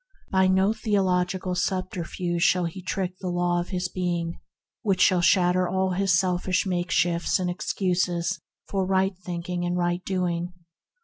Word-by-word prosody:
By 190 Hz, 0 st, +4 dB
no 190 Hz, +3 st, +3 dB
theological 185 Hz, -4 st, 0 dB
subterfuge 180 Hz, -2 st, 0 dB
may 175 Hz, -2 st, 0 dB
he 185 Hz, -, -9 dB
trick 185 Hz, 0 st, -3 dB
the 185 Hz, -, -3 dB
Law 175 Hz, 0 st, +1 dB
of 175 Hz, -, -6 dB
his 185 Hz, -1 st, -1 dB
being, 175 Hz, -2 st, -2 dB, 0.4 s
which 195 Hz, -3 st, +1 dB
shall 185 Hz, -1 st, +4 dB
shatter 180 Hz, 0 st, +3 dB
all 190 Hz, 0 st, 0 dB
his 185 Hz, -2 st, +2 dB
selfish 185 Hz, 0 st, 0 dB
makeshifts 175 Hz, -2 st, +1 dB
and 180 Hz, -1 st, -1 dB
excuses 175 Hz, -1 st, -1 dB, 0.3 s
for 195 Hz, -1 st, -1 dB
right 190 Hz, +1 st, +1 dB
thinking 175 Hz, 0 st, -4 dB
and 175 Hz, 0 st, -1 dB
right 175 Hz, 0 st, 0 dB
doing. 180 Hz, -2 st, -2 dB
180 Hz, 145 wpm, -25 LUFS, 175-190 Hz, 0.4 s, By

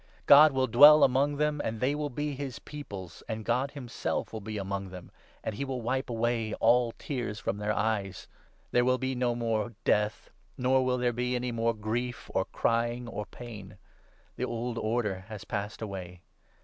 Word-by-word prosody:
God 150 Hz, +2 st, +9 dB
will 130 Hz, -1 st, +1 dB
dwell 145 Hz, +4 st, +8 dB
among 140 Hz, +2 st, +3 dB
them, 150 Hz, 0 st, +1 dB
and 110 Hz, 0 st, -3 dB
they 130 Hz, +4 st, +1 dB
will 150 Hz, 0 st, -2 dB
be 145 Hz, +3 st, -3 dB
his 135 Hz, -2 st, -5 dB
Peoples, 100 Hz, -, -9 dB
and 110 Hz, -1 st, -4 dB
God 125 Hz, +4 st, +1 dB
himself 135 Hz, -6 st, -4 dB
will 110 Hz, -, -5 dB
be 110 Hz, +1 st, -5 dB
among 100 Hz, -1 st, -3 dB
them, 90 Hz, -1 st, -10 dB, 0.3 s
and 110 Hz, -, -3 dB
he 115 Hz, -, -3 dB
4 -, -, -5 dB
will 125 Hz, -, -4 dB
wipe 130 Hz, +3 st, -1 dB
away 115 Hz, -1 st, -1 dB
all 120 Hz, +1 st, +3 dB
tears 120 Hz, -7 st, -4 dB
from 100 Hz, -, -2 dB
their 105 Hz, 0 st, -1 dB
eyes. 100 Hz, -2 st, -1 dB, 0.4 s
There 120 Hz, -, +4 dB
will 130 Hz, +1 st, +3 dB
be 130 Hz, 0 st, -2 dB
no 125 Hz, -1 st, 0 dB
more 115 Hz, -1 st, -1 dB
death, 105 Hz, +1 st, 0 dB, 0.3 s
nor 130 Hz, +1 st, +3 dB
will 130 Hz, 0 st, +1 dB
there 120 Hz, -1 st, +1 dB
be 125 Hz, +1 st, -1 dB
any 125 Hz, 0 st, -2 dB
more 115 Hz, 0 st, 0 dB
grief 115 Hz, +3 st, -3 dB
or -, -, +1 dB
crying 120 Hz, +1 st, 0 dB
or 105 Hz, -3 st, -5 dB
pain. 105 Hz, -6 st, -10 dB, 0.6 s
The -, -, -1 dB
old 120 Hz, 0 st, -3 dB
order 105 Hz, -4 st, -1 dB
has 110 Hz, -3 st, -8 dB
passed 105 Hz, +2 st, -4 dB
away.' 90 Hz, -4 st, -7 dB
120 Hz, 190 wpm, -29 LUFS, 105-130 Hz, 0.6 s, God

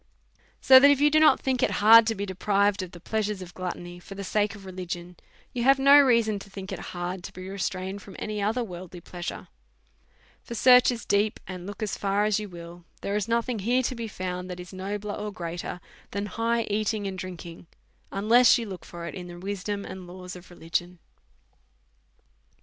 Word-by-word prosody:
So 260 Hz, 0 st, +9 dB
that, 280 Hz, +2 st, +7 dB
if 285 Hz, -1 st, +4 dB
you 295 Hz, +1 st, +4 dB
do 310 Hz, -, +5 dB
not 310 Hz, -, +6 dB
think 260 Hz, -2 st, 0 dB
it -, -, +3 dB
hard 220 Hz, +2 st, +7 dB
to 225 Hz, -, +1 dB
be 200 Hz, 0 st, -3 dB
deprived 200 Hz, +1 st, +1 dB
of 185 Hz, -, -6 dB
the 175 Hz, -, -12 dB
pleasures 210 Hz, 0 st, -2 dB
of 175 Hz, -1 st, -12 dB
gluttony 175 Hz, -1 st, -6 dB
for 195 Hz, +3 st, -11 dB
the 200 Hz, -, -6 dB
sake 210 Hz, +2 st, 0 dB
of 200 Hz, -2 st, -12 dB
religion, 180 Hz, -1 st, -6 dB, 0.4 s
you 240 Hz, -, -2 dB
have 270 Hz, +2 st, +6 dB
no 275 Hz, +2 st, +7 dB
reason 230 Hz, -6 st, +3 dB
to 200 Hz, -, -12 dB
think 195 Hz, -1 st, -8 dB
it -, -, -4 dB
hard 175 Hz, +1 st, -4 dB
to 190 Hz, -, -7 dB
be 185 Hz, 0 st, -9 dB
restrained 190 Hz, 0 st, -4 dB
from 195 Hz, -, -12 dB
any 210 Hz, -1 st, -4 dB
other 225 Hz, +5 st, 0 dB
worldly 180 Hz, -3 st, -8 dB
pleasure; 175 Hz, +1 st, -7 dB, 0.9 s
for 235 Hz, -, -8 dB
search 250 Hz, +1 st, +7 dB
as 240 Hz, -2 st, -3 dB
deep, 205 Hz, +1 st, +1 dB
and 185 Hz, -1 st, -7 dB
look 205 Hz, +2 st, -6 dB
as 205 Hz, -5 st, -3 dB
far 200 Hz, +1 st, +1 dB
as 215 Hz, -1 st, +2 dB
you 210 Hz, -1 st, -6 dB
will, 170 Hz, 0 st, -11 dB, 0.2 s
there 200 Hz, -, -2 dB
is 210 Hz, 0 st, -1 dB
nothing 235 Hz, 0 st, 0 dB
here 245 Hz, +6 st, +1 dB
to 255 Hz, -, -1 dB
be 230 Hz, -2 st, -5 dB
found 180 Hz, -2 st, -5 dB
that 180 Hz, 0 st, -6 dB
is 180 Hz, +2 st, -10 dB
nobler 205 Hz, +2 st, -4 dB
or 210 Hz, 0 st, -4 dB
greater 175 Hz, -2 st, -5 dB, 0.3 s
than 200 Hz, +1 st, -3 dB
high 230 Hz, +3 st, 0 dB
eating 210 Hz, 0 st, -1 dB
and 190 Hz, -1 st, -4 dB
drinking, 175 Hz, -2 st, -8 dB, 0.4 s
unless 225 Hz, +5 st, +5 dB
you 235 Hz, -, -3 dB
look 190 Hz, -4 st, -8 dB
for 170 Hz, -1 st, -8 dB
it 170 Hz, -, -6 dB
in 180 Hz, -1 st, -7 dB
the 175 Hz, 0 st, -9 dB
wisdom 200 Hz, +2 st, -4 dB
and 185 Hz, -1 st, -8 dB
laws 180 Hz, 0 st, -9 dB
of 180 Hz, 0 st, -13 dB
religion. 175 Hz, +1 st, -3 dB
200 Hz, 205 wpm, -26 LUFS, 180-220 Hz, 0.9 s, So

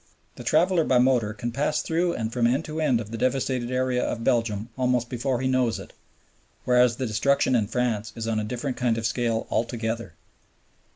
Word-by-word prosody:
The -, -, -9 dB
traveler 170 Hz, +2 st, +3 dB
by 130 Hz, -, +3 dB
motor 125 Hz, -4 st, +3 dB
can 115 Hz, +3 st, -4 dB
pass 145 Hz, +5 st, 0 dB
through 170 Hz, +1 st, 0 dB
and 110 Hz, -4 st, -3 dB
from 120 Hz, -2 st, +2 dB
end 135 Hz, +6 st, 0 dB
to 155 Hz, +1 st, -4 dB
end 135 Hz, -7 st, +2 dB
of 110 Hz, -2 st, -7 dB
the 115 Hz, -, -5 dB
devastated 130 Hz, -1 st, 0 dB
area 130 Hz, -1 st, 0 dB
of 115 Hz, -, -3 dB
Belgium 115 Hz, -2 st, 0 dB
almost 125 Hz, -2 st, 0 dB
before 125 Hz, 0 st, -1 dB
he 130 Hz, -, 0 dB
knows 130 Hz, -3 st, +1 dB
it; -, -, -11 dB, 0.7 s
whereas 125 Hz, -1 st, +4 dB
the 130 Hz, -, -3 dB
destruction 130 Hz, +4 st, +2 dB
in 110 Hz, -4 st, +2 dB
France 115 Hz, -2 st, -1 dB
is 115 Hz, -1 st, -4 dB
on 110 Hz, -1 st, 0 dB
a -, -, -2 dB
different 125 Hz, +4 st, -4 dB
kind 120 Hz, -3 st, +1 dB
of 115 Hz, -, -3 dB
scale 115 Hz, -2 st, 0 dB
altogether. 115 Hz, -3 st, -2 dB
125 Hz, 195 wpm, -25 LUFS, 115-130 Hz, 0.7 s, whereas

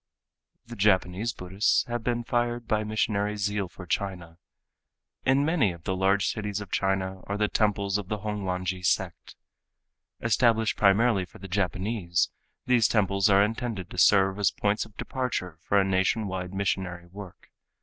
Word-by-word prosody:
The 120 Hz, 0 st, -9 dB
Japanese 100 Hz, +1 st, +2 dB
Buddhists 95 Hz, 0 st, +1 dB
have 120 Hz, -1 st, -4 dB
been 120 Hz, 0 st, -1 dB
fired 120 Hz, 0 st, -1 dB
by 110 Hz, 0 st, +1 dB
missionary 105 Hz, -1 st, -1 dB
zeal 100 Hz, -1 st, -1 dB
for 90 Hz, -, -11 dB
China. 90 Hz, -3 st, -4 dB, 0.9 s
In 135 Hz, +2 st, +4 dB
many 155 Hz, -, +2 dB
of 85 Hz, -2 st, -11 dB
the 95 Hz, -, -1 dB
large 95 Hz, +1 st, +2 dB
cities 105 Hz, -2 st, -2 dB
of 105 Hz, -3 st, -9 dB
China 95 Hz, -1 st, -1 dB
are 100 Hz, -, -2 dB
the 105 Hz, 0 st, +2 dB
temples 100 Hz, -2 st, +1 dB
of 100 Hz, -, -7 dB
the 105 Hz, -, -2 dB
Hongwanji 95 Hz, -3 st, -3 dB
sect. 90 Hz, -, -1 dB, 0.8 s
Established 115 Hz, -1 st, +2 dB
primarily 100 Hz, 0 st, +3 dB
for -, -, -16 dB
the 95 Hz, -, -9 dB
Japanese, 95 Hz, -1 st, -1 dB, 0.3 s
these 120 Hz, -4 st, +4 dB
temples 100 Hz, -2 st, +2 dB
are 100 Hz, 0 st, +6 dB
intended 110 Hz, -4 st, -3 dB
to 90 Hz, -, -4 dB
serve 95 Hz, +2 st, +4 dB
as 100 Hz, -, +4 dB
points 105 Hz, +1 st, -1 dB
of 110 Hz, -2 st, -19 dB
departure 115 Hz, -, -3 dB
for 100 Hz, -, +2 dB
a 95 Hz, -, +2 dB
nation 95 Hz, +3 st, +1 dB
wide 90 Hz, -2 st, -4 dB
missionary 95 Hz, -3 st, -2 dB
work. 95 Hz, +1 st, -12 dB
100 Hz, 160 wpm, -27 LUFS, 95-110 Hz, 0.9 s, are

